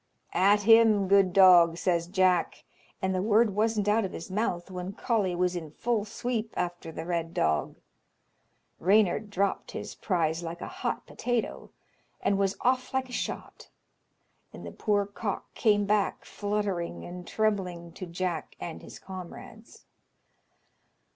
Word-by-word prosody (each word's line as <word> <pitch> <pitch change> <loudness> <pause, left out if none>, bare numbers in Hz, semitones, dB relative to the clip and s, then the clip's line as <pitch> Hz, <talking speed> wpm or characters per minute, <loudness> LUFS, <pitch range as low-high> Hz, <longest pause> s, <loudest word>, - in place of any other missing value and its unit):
"At 200 +3 +4
him, 225 -2 +6
good 195 -1 +4
dog!" 175 -3 +7
says 170 -2 0
Jack, 185 -2 +1 0.4
and 190 0 +1
the 185 - 0
word 215 +1 +3
wasn't 215 -1 +1
out 215 +2 +3
of 190 - -4
his 170 - -7
mouth 190 -3 -2
when 180 +1 -5
Coley 205 -5 0
was 180 0 0
in 165 -3 -5
full 220 +6 -1
sweep 225 0 -3
after 175 -2 -3
the 160 0 -6
Red 170 -1 -2
Dog. 80 -1 0 1.0
Reynard 205 +2 +3
dropped 200 0 -1
his - - -6
prize 165 -3 -1
like 170 0 -6
a - - -6
hot - - -2
potato, 245 -2 -3 0.5
and 200 -1 +1
was 195 0 0
off 255 +1 0
like 260 -1 0
a - - -10
shot, - - -5 0.8
and - - -10
the - - -7
poor 205 -1 0
cock 200 0 -5
came 205 -2 +2
back 205 -1 0
fluttering 200 - -3
and 180 0 -8
trembling 185 -6 -1
to 185 +2 -8
Jack 175 -1 -3
and 165 - -6
his - - -11
comrades. 190 +4 -11
195 Hz, 145 wpm, -28 LUFS, 175-210 Hz, 1.0 s, dog